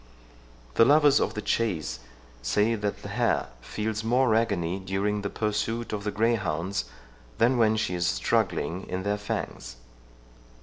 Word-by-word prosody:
The - - +6
lovers 145 +2 +6
of - - -1
the 105 - -4
chase 100 -9 -1 0.4
say 105 - +2
that 105 -2 -3
the - - -6
hare - - 0
feels 110 - -3
more 120 +1 +3
agony 100 -6 0
during 100 +2 -1
the 100 - -3
pursuit 110 +2 -2
of 100 -1 -3
the 105 - 0
greyhounds, 100 - 0 0.5
than 120 +2 +3
when 110 -1 +4
she 110 - -1
is 85 -1 0
struggling 80 +8 0
in 95 0 -3
their 105 +1 -1
fangs. 100 -10 -4
105 Hz, 145 wpm, -27 LUFS, 95-115 Hz, 0.5 s, The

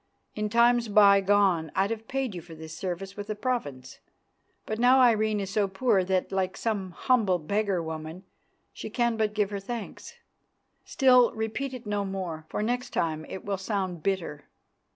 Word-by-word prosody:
In 210 0 -2
times 235 +1 +4
bygone 200 -5 +4
I'd 195 +3 +1
have 225 -1 -5
paid 265 -4 -2
you 175 - -6
for 165 0 -12
this 160 0 -9
service 190 +1 -5
with 205 0 -7
a 215 - -2
province, 205 - -4 0.7
but 215 +1 -4
now 250 +2 +5
Irene 220 -4 +3
is 195 -1 -4
so 205 -1 +1
poor 195 0 +1
that, 185 0 -1
like 190 -1 -1
some 205 -5 -2
humble 205 0 +1
beggar 195 +2 -1
woman, 160 +2 -7 0.5
she - - -7
can 235 -2 0
but 215 -1 -1
give 210 -1 0
her 200 - -3
thanks. 225 +2 -7 0.7
Still, 250 -3 +5
repeat 225 +5 -3
it 245 -2 -10
no 205 -1 -1
more, 180 -5 -5
for - - -2
next 245 +2 -2
time 155 -1 -1
it 190 - -7
will 200 -2 -2
sound 190 -4 -3
bitter. 165 -5 -2
200 Hz, 170 wpm, -27 LUFS, 185-225 Hz, 0.7 s, now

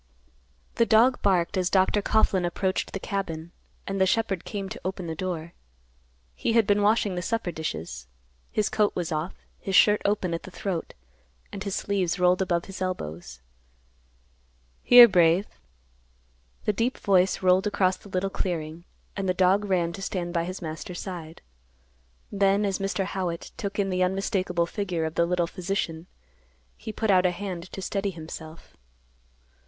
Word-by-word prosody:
The 230 - +4
dog 240 +3 +4
barked 190 -1 +2
as 185 -1 +1
Dr. 190 +2 +3
Coughlan 200 -3 +2
approached 185 +2 -1
the 195 - -3
cabin, 170 -5 -4 0.3
and 195 -1 -2
the 190 - +5
shepherd 195 -3 0
came 200 -3 -4
to - - -7
the - - -5
open 180 -3 -4
door. 170 -1 -4 0.8
He 225 - -1
had 230 -2 +4
been 205 0 +2
washing 205 -1 +2
the 180 - -3
supper 205 0 -2
dishes. 80 - -5 0.4
His 215 - +1
coat 210 -1 +1
was 175 -1 -2
off, 155 +3 -2 0.2
his 195 - -3
shirt 210 +2 +6
open 200 -4 0
at 165 - -2
the - - -10
throat, 185 -2 -4 0.6
and 200 - -6
his 200 -2 -3
sleeves 195 -3 -1
rolled 180 +1 +3
above 175 -2 0
his 195 -1 -9
elbows. 80 - -5 1.4
"Here, 245 -1 +10
Brave." 175 -1 +4 1.2
The 210 - +2
deep 230 +5 0
voice 190 -1 +2
rolled 185 +2 +4
across 190 -2 +2
the 200 - -15
little 190 +1 -1
clearing, 165 -3 -4 0.3
and 195 -2 -2
the 180 - +1
dog 190 +3 +3
ran 175 -4 0
to 195 - -8
stand 175 -3 -3
by 170 -1 0
his 185 +1 -6
master's 160 +3 -6
side. 170 -4 -7 0.9
Then, 200 0 +2
as 195 -2 -1
Mr. 195 0 -1
Howitt 180 -3 -4
took 200 -1 -5
in 195 -2 0
the 185 0 0
unmistakable 185 -2 0
figure 175 -3 -2
of 160 - -3
the 170 0 +2
little 175 -1 +1
physician, 175 -2 -3 0.7
he - - -7
put 215 0 0
out 185 -1 +5
a - - +2
hand 180 -1 -6
to 195 - -6
steady 200 +1 -1
himself. 160 -2 -10
185 Hz, 165 wpm, -26 LUFS, 170-200 Hz, 1.4 s, Here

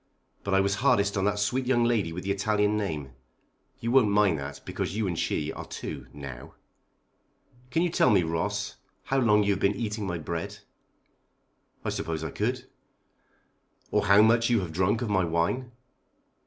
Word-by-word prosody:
But 100 -1 0
I 95 - +5
was 100 0 +1
hardest 105 -7 +3
on 95 -1 0
that 105 0 +1
sweet 125 +5 0
young 120 -2 +3
lady 115 -8 +1
with 90 +2 -6
the 100 - -1
Italian 105 +1 +1
name. 80 -10 -3 0.7
You 115 - -1
won't 125 -5 +5
mind 100 -6 +3
that 70 0 -6
because 100 - -3
you 110 - 0
and 90 - -1
she 75 0 -1
are - - -7
two, - - -6
now." 70 -4 -9 1.1
"Can 165 +6 +1
you 175 - +1
tell - - +4
me, 100 -4 +4
Ross, 80 0 -2 0.3
how 135 - 0
long 105 -4 +4
you 100 - +2
have 95 - -3
been 100 +1 +2
eating 105 -1 -3
my 90 -2 -2
bread?" 85 +1 -5 1.3
"I - - 0
suppose 80 -1 -3
I 80 - -4
could." 125 - -2 1.3
"Or - - +1
how 100 +2 +7
much 115 +1 +4
you 115 -3 +3
have 90 -3 -5
drank 100 +7 +1
of 115 - -3
my 95 -2 +3
wine?" 85 +10 -1
100 Hz, 180 wpm, -27 LUFS, 85-115 Hz, 1.3 s, how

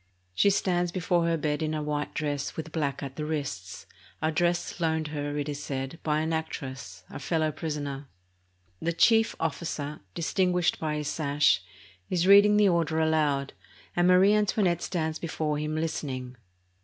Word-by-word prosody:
She 200 - +4
stands 180 -3 +1
before 175 -1 +1
her 165 0 +1
bed 150 -1 -1
in 155 0 -1
a 155 - -2
white 150 0 -3
dress 145 -2 -2
with 160 0 -5
black 145 -4 -2
at 135 -1 -7
the 155 - -3
wrists, 140 - -4 0.3
a 155 - 0
dress 175 +2 0
loaned 160 -2 0
her, 145 -1 -3
it 145 0 -2
is 145 -1 -4
said, 135 +2 -4
by 155 0 +1
an 160 +1 -1
actress, 135 - -5
a - - -6
fellow 155 +2 0
prisoner. 145 -3 -4 0.7
The 170 - 0
chief 225 +6 +4
officer, 150 -2 -3 0.2
dis 165 - -3
tinguished 180 -3 +2
by 155 -1 -1
his 150 -1 -3
sash, 145 - +2 0.5
is 180 -1 +1
reading 205 +2 +7
the 210 -1 +5
order 165 -3 +1
aloud, 150 -3 +1 0.4
and 175 0 +3
Marie 185 +3 +6
Antoinette 205 -4 +2
.stands 160 -3 -2
before 155 -3 -2
him 150 +1 -2
listening. 135 -6 -3
155 Hz, 165 wpm, -28 LUFS, 145-170 Hz, 0.7 s, reading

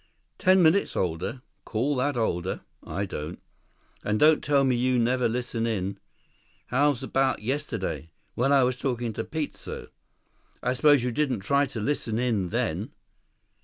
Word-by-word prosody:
"Ten 185 -1 +5
minutes 170 +5 +3
older. 95 +8 -2 0.2
Call 130 +7 -1
that 135 +1 0
older? 90 -7 -1 0.2
I 100 +2 -3
don't. 80 -2 -6 0.6
And 105 0 0
don't 155 0 +5
tell 140 -2 +3
me 130 -2 +3
you 125 +1 +2
never 120 +1 +2
listen 120 -1 -2
in. 100 -3 -2 0.7
How 145 +4 +4
'bout 135 -1 0
yesterday? 130 - -3 0.2
When 135 +4 +1
I 140 -2 +6
was 125 0 +1
talking 120 -4 -2
to 110 - -3
Peteso? 155 +2 -5 0.7
I 125 - +1
suppose 145 -1 +5
you 125 - 0
didn't 130 -4 0
try 140 +6 +2
to 130 -4 -6
listen 115 -2 -1
in 115 -7 0
then." - - -2
125 Hz, 150 wpm, -27 LUFS, 110-140 Hz, 0.7 s, I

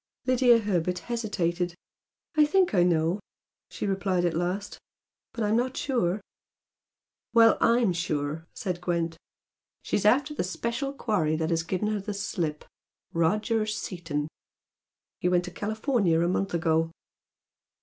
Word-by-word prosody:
Lydia 255 -2 +5
Herbert 180 -5 0 0.2
hesitated. 175 -6 -1 0.6
"I 305 - +6
THINK 360 - +3
I 180 - +4
know," 170 +1 +2 0.5
she - - -5
replied 190 -2 0
at 170 - +1
last 180 +5 -2 0.5
"But 230 - -3
I'm 210 +1 +2
not 255 +2 0
sure." 215 -8 0 1.1
"Well, 230 -1 +7
I'M 230 -5 +4
sure" 155 -1 -2
said 180 -4 -3
Gwent 170 -2 -1 0.7
"She's 205 - 0
after 275 +8 +3
the - - -1
special 235 +8 -2
quarry 200 - 0
that 160 +1 -1
has 165 -1 +2
given 185 +5 -2
her 215 -1 -1
the 205 +1 -5
slip, 170 -6 -3 0.5
Roger 215 +6 +1
Seaton. 170 -8 -3 0.9
He 180 - +1
went 180 0 +2
to 180 - -7
California 215 - +1
a 170 - +2
month 185 0 0
ago." 165 -1 +2
185 Hz, 135 wpm, -27 LUFS, 170-220 Hz, 1.1 s, Well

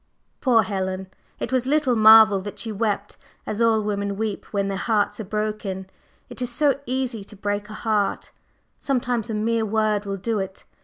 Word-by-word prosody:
Poor 240 -5 +4
Helen! 190 -1 -3 0.3
It - - -4
was 255 -1 +1
little 290 -3 +2
marvel 220 -2 +8
that 205 +1 -7
she 225 - -4
wept 205 -1 -2 0.3
as 215 +2 -3
all 225 -2 +3
women 200 -1 -2
weep 215 -2 -3
when 200 -1 -2
their 195 - -2
hearts 210 +1 0
are - - -3
broken. 210 -2 -3 0.4
It - - -7
is 250 - -1
so 280 +2 +2
easy 250 -4 -2
to 205 - -12
break 205 +1 -3
a - - -7
heart; 215 -3 -1 0.5
sometimes 245 -5 -1
a 220 - -2
mere 225 +1 +1
word 215 -1 0
will 195 0 -2
do 215 +2 -1
it. 190 0 -6
215 Hz, 185 wpm, -23 LUFS, 200-230 Hz, 0.5 s, marvel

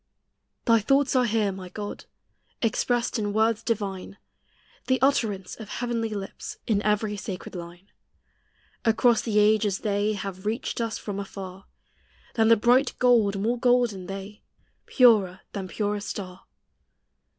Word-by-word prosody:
Thy 230 -1 +5
thoughts 275 +5 +2
are 250 -1 +4
here, 215 -3 +1
my 185 -1 -8
God, 205 +2 -7 0.6
Expressed 240 +1 0
in 205 -1 -2
words 220 +1 +2
divine, 200 -4 -3 0.7
The 260 0 +2
utterance 220 -8 +1
of 215 -2 -9
heavenly 230 0 -2
lips 200 -2 -6
In 205 -3 +1
every 210 0 0
sacred 190 -2 -6
line. 175 +1 -10 0.9
Across 230 0 +3
the 215 -3 -1
ages 210 -1 +3
they 205 0 0
Have 195 -1 -6
reached 230 +2 -2
us 230 -1 -2
from 200 -2 -5
afar, 195 -1 -8 0.7
Than 225 -2 +3
the 230 0 +6
bright 245 +5 +3
gold 225 -6 +3
more 235 +4 0
golden 240 -7 +2
they, 195 +2 -7 0.5
Purer 205 -7 +4
than 195 -2 -5
purest 205 +1 -2
star. 185 -2 -7
210 Hz, 135 wpm, -26 LUFS, 195-230 Hz, 0.9 s, the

